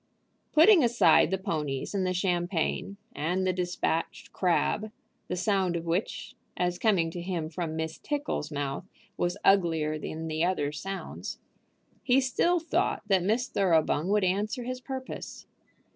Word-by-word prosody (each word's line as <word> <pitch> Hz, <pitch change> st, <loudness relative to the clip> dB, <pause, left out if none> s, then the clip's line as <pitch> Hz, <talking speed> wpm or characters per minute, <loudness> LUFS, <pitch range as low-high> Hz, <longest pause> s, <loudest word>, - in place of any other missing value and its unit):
Putting 330 Hz, +1 st, +7 dB
aside 210 Hz, -11 st, +5 dB
the 190 Hz, -, 0 dB
ponies 150 Hz, -7 st, -3 dB
and 190 Hz, -2 st, 0 dB
the -, -, +1 dB
champagne, 175 Hz, +1 st, -1 dB, 0.2 s
and 180 Hz, +5 st, 0 dB
the 185 Hz, -, +2 dB
despatched 175 Hz, -2 st, -2 dB
crab, 195 Hz, +4 st, +1 dB, 0.4 s
the -, -, -2 dB
sound 190 Hz, -2 st, +1 dB
of 170 Hz, 0 st, -3 dB
which, 170 Hz, +5 st, -2 dB, 0.2 s
as 180 Hz, 0 st, 0 dB
coming 185 Hz, -7 st, +2 dB
to 175 Hz, -, -6 dB
him 170 Hz, -3 st, -3 dB
from 160 Hz, -1 st, -3 dB
Miss 160 Hz, 0 st, -4 dB
Tickle's 290 Hz, -, -3 dB
mouth, 145 Hz, +5 st, -4 dB, 0.3 s
was 175 Hz, +2 st, -1 dB
uglier 160 Hz, -5 st, +3 dB
than 160 Hz, +2 st, -5 dB
the 155 Hz, +1 st, -1 dB
other 175 Hz, -5 st, 0 dB
sounds, 195 Hz, +6 st, -6 dB, 0.6 s
he 260 Hz, 0 st, +4 dB
still 305 Hz, +7 st, +2 dB
thought 330 Hz, -, 0 dB
that 190 Hz, -2 st, +4 dB
Miss 225 Hz, +8 st, +1 dB
Thoroughbung 165 Hz, -4 st, +2 dB
would 205 Hz, 0 st, +2 dB
answer 205 Hz, +6 st, 0 dB
his 255 Hz, +1 st, -5 dB
purpose. 260 Hz, 0 st, -7 dB
180 Hz, 145 wpm, -28 LUFS, 165-210 Hz, 0.6 s, Putting